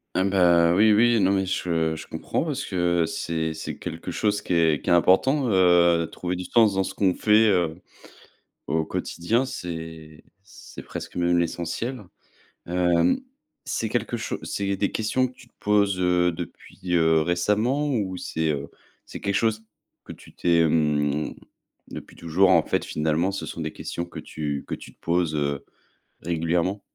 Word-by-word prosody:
Eh 95 - +2
ben, 85 -3 +4
oui, 105 +3 +5
oui, 115 +2 +4
non 95 -1 +3
mais 95 -1 +1
je 80 -3 -1
je 80 - -9
comprends - - -3
parce - - -3
que 85 -2 +1
c'est 80 -1 -3
c'est 80 - -6
quelque 85 0 -7
chose 105 +3 0
qui - - -3
est 80 -3 +3
qui - - -4
est - - +5
important, 125 - +3
heu, 85 -3 +4
trouver 90 0 -3
du 90 0 -5
sens 110 -4 +4
dans 95 - +1
ce - - -6
qu'on 95 -3 +2
fait, 110 +1 +4
heu, 90 -5 +1 0.9
au 80 +2 0
quotidien, 85 +10 -1
c'est 80 - -7 0.2
c'est 100 - -12
presque - - -8
même 85 0 +2
l'essentiel. 85 +9 -2 0.6
Hem, 90 - +2 0.5
c'est 110 - -2
quelque 120 +1 -2
cho - - -4
c'est 100 -1 -2
des 100 +1 -1
questions 130 +4 0
que 125 - -15
tu 125 -1 -17
te - - -32
poses, 100 -2 +2
heu, 90 -1 +2
depuis, 85 +1 -9 0.2
heu, 80 -1 +4
récemment? 105 - +1
Ou 100 -8 -1
c'est, 80 -2 -2
heu, 70 -2 -2 0.4
c'est - - -9
quelque 100 -1 -1
chose 110 0 +1 0.4
que - - -10
tu - - -14
t'es, 85 -1 +2
hem 75 -2 +1 0.5
depuis - - -10
toujours 85 +4 +2
en - - +5
fait - - -1
finalement 80 +5 0
ce 100 - -5
sont 85 - -6
des 80 -1 -4
questions 85 - -5
que 85 - -12
tu 75 -3 -4
que - - -4
tu - - -8
te - - -48
poses, 85 -2 0
heu, 70 -1 -1 0.6
régulièrement? 85 +4 -1
90 Hz, 175 wpm, -24 LUFS, 80-100 Hz, 0.9 s, oui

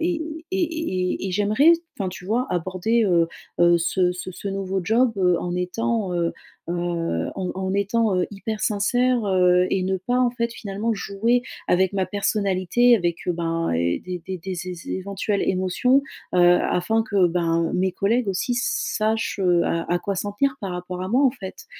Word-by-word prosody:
et 335 0 0 0.3
et 375 -1 0
et 300 - -2
et - - -3
j'aimerais 210 - +4 0.2
enfin, 195 -3 -2
tu 180 -1 -9
vois, 240 +6 0
aborder, 185 +6 0
heu 170 -3 +3 0.3
heu, 175 0 +6
ce 180 +1 +1
ce 180 +1 -6
ce 200 - -6
nouveau 195 -1 -2
job, 230 +4 +3
heu, 180 -2 +3
en 175 0 -3
étant, 205 +2 -1
heu 170 -1 0 0.4
heu, - - -1 0.6
en 185 -2 -2
en 190 0 -2
étant, 200 0 +1
heu, 180 - +1
hyper 215 +2 -4
sincère, 245 +3 +1
heu, 180 -1 +3
et 190 -1 +1
ne 190 0 0
pas, 245 +7 -1
en 250 -1 +3
fait, 235 -1 -2
finalement, 215 +1 -3
jouer 225 +5 0 0.3
avec 185 +2 +3
ma 190 -2 0
personnalité 200 +3 +2
avec, 175 -4 -1
heu, - - +3
ben, 165 -1 -1
et 85 +1 0
des 180 -1 -6
des 190 -1 -4
des 185 +2 -5
zé 180 +1 -5 0.2
éventuelles 200 +2 -2
émotions, 190 +9 +2 0.3
heu, - - +3 0.2
afin 220 +5 +1
que, 195 -4 +3
ben, 165 -1 +1
heu, - - -6
mes 185 0 +1
collègues 225 +6 +1
aussi 195 +5 -1
s 240 - -1
sachent, 220 0 0
heu, 175 -2 +3
à 165 0 -1
à 175 - +2
quoi 200 -1 -3
s'en 205 +2 -3
tenir 265 +5 0
par 195 -3 -4
rapport 180 0 -5
à 185 - -3
moi, 255 +7 +3
en 260 - +5
fait. 245 - -9
195 Hz, 195 wpm, -23 LUFS, 180-225 Hz, 0.6 s, heu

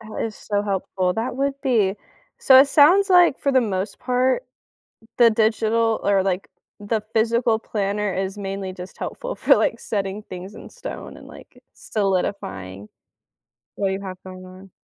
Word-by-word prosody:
That 220 -1 -6
is 225 -1 -5
so 205 -1 -2
helpful. 190 -2 -1
That 240 +3 -3
would 275 +1 0
be. 220 -8 +2 0.4
So 260 -1 +7
it 270 - +7
sounds 350 +8 +5
like, 355 -6 +5
for 280 - 0
the 260 - +5
most 200 -3 -3
part, 255 - +1 0.7
the 235 -1 +7
digital, 225 0 +1
or, 200 -1 +2
like, 190 0 -2 0.3
the 210 +2 -2
physical 230 0 +2
planner 205 -2 -2
is 190 +1 -3
mainly 195 -1 -4
just 185 0 -10
helpful - - -5
for - - +4
like, - - 0
setting 200 -1 -3
things 185 0 -9
in - - -11
stone, - - -8
and, - - -13
like, - - -15
solidifying, 105 - -3 0.9
what 200 - -1
do - - -1
you 195 - -4
have 190 -2 -7
going 185 0 -10
on. 185 +1 -14
210 Hz, 165 wpm, -22 LUFS, 190-235 Hz, 0.9 s, So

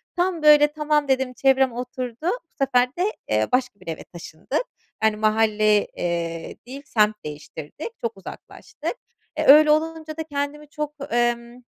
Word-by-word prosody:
tam, 355 -3 0
böyle, 295 0 +7
tamam 300 -1 0
dedim 265 -1 +1
çevrem 265 0 +3
oturdu 250 -1 -5
bu 425 +9 0 0.2
sefer 250 -2 +3
de, 355 - 0 0.3
eee, 110 0 +2
başka 250 -5 0
bir - - -18
eve 160 - -5
taşındık, 170 - -5 0.4
yani, 220 -1 +3
mahalle, 215 -1 +2
eee, 170 -1 -4
değil, 275 +2 -8
semt 215 -3 +2
değiştirdik, 150 - -7
çok 230 -3 -3
uzaklaştık. 195 - -8 0.4
E, - - -1
öyle 300 +2 +8
olunca 315 0 -1
da 320 - -2
kendimi 290 0 -4
çok, 300 0 -4 0.2
emm, 240 0 0
255 Hz, 150 wpm, -23 LUFS, 215-300 Hz, 0.4 s, öyle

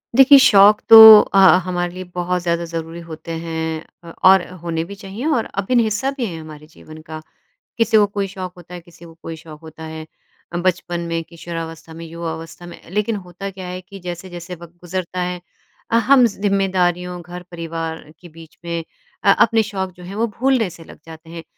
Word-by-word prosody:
देखिए, 270 +1 +8
शौक 210 -4 +6
तो 225 - +11 0.2
अ, - - -2 0.3
हमारे 175 -1 -3
लिए 185 +1 -7
बहुत 180 0 -1
ज़्यादा 170 0 -1
ज़रूरी 165 0 -6
होते 160 0 -9
हैं 160 -1 -4 0.2
अ, 170 - -11
और 190 -1 +6 0.2
होने 165 -1 -2
भी 200 +3 -10
चाहिए 200 +5 -8
और 230 - -1 0.2
अभिन्न 235 +4 +2
हिस्सा 225 +5 -1
भी 250 - -2
है 205 - -5
ये 165 - -7
हमारे 155 -1 -12
जीवन 155 0 -13
का। 155 0 -7 0.6
किसी 230 -1 +3
को 210 - +5
कोई 200 -1 -3
शौक 185 -1 -7
होता 175 0 -14
है 180 - -7
किसी 170 0 -17
को 165 - -14
कोई 165 - -7
शौक 155 -1 -13
होता 160 0 -12
है 160 0 -8 0.5
अ, - - -2
बचपन 175 -1 -1
में, 165 -1 -3
किशोरावस्था 165 -1 -8
में, 165 +1 -9
युवावस्था 165 +1 -7
में। 175 - -12
लेकिन 210 +3 -1
होता 190 +3 -7
क्या 190 -1 -9
है 180 0 -6
कि 195 +2 -13
जैसे-जैसे 175 0 -7
वक़्त 170 0 -14
गुज़रता 180 0 -4
है 180 0 -3 0.5
अ, - - +2
हम 255 +2 +5
ज़िम्मेदारियों, 185 -4 -1
घर-परिवार 165 -2 -7 0.2
के 175 - -14
बीच 165 0 -16
में 170 -1 -3 0.4
अ, 200 - +5
अपने 225 +2 +3
शौक 190 -3 -4
जो 180 - -13
हैं, 185 +3 -9
वो 230 +2 0
भूलने 255 -5 +2
से 165 -1 -13
लग - - -15
जाते 160 0 -13
हैं। 165 0 -9
175 Hz, 195 wpm, -19 LUFS, 165-195 Hz, 0.6 s, तो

